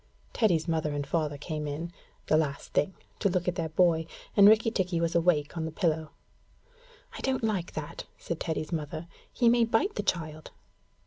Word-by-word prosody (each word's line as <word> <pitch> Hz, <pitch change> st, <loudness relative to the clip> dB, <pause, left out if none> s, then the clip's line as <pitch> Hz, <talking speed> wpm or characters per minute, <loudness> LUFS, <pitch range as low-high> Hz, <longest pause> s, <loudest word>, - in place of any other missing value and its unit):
Teddy's 180 Hz, -9 st, +2 dB
mother 155 Hz, -3 st, 0 dB
and 145 Hz, -1 st, -2 dB
father 150 Hz, -1 st, -1 dB
came 150 Hz, 0 st, -4 dB
in, 160 Hz, +4 st, -4 dB, 0.3 s
the -, -, +3 dB
last 150 Hz, -3 st, -1 dB
thing, 185 Hz, +5 st, +1 dB, 0.2 s
to 200 Hz, -, +2 dB
look 180 Hz, -1 st, -1 dB
at 180 Hz, -, +2 dB
their 165 Hz, -2 st, -2 dB
boy, 165 Hz, -1 st, +3 dB, 0.3 s
and 200 Hz, -1 st, +8 dB
Rikki 220 Hz, +1 st, +4 dB
tikki 185 Hz, -5 st, 0 dB
was 165 Hz, 0 st, 0 dB
awake 165 Hz, -3 st, +2 dB
on 160 Hz, -1 st, -2 dB
the 160 Hz, -, -4 dB
pillow. 160 Hz, -1 st, 0 dB, 1.0 s
'I -, -, -7 dB
don't 265 Hz, -2 st, 0 dB
like 200 Hz, -6 st, -1 dB
that,' 155 Hz, -1 st, -6 dB
said 170 Hz, -, -5 dB
Teddy's 160 Hz, -1 st, -3 dB
mother; 155 Hz, 0 st, -3 dB, 0.3 s
'he 240 Hz, -, +2 dB
may 235 Hz, 0 st, +5 dB
bite 230 Hz, -, +2 dB
the -, -, -2 dB
child.' 155 Hz, -2 st, -2 dB
165 Hz, 185 wpm, -29 LUFS, 155-185 Hz, 1.0 s, and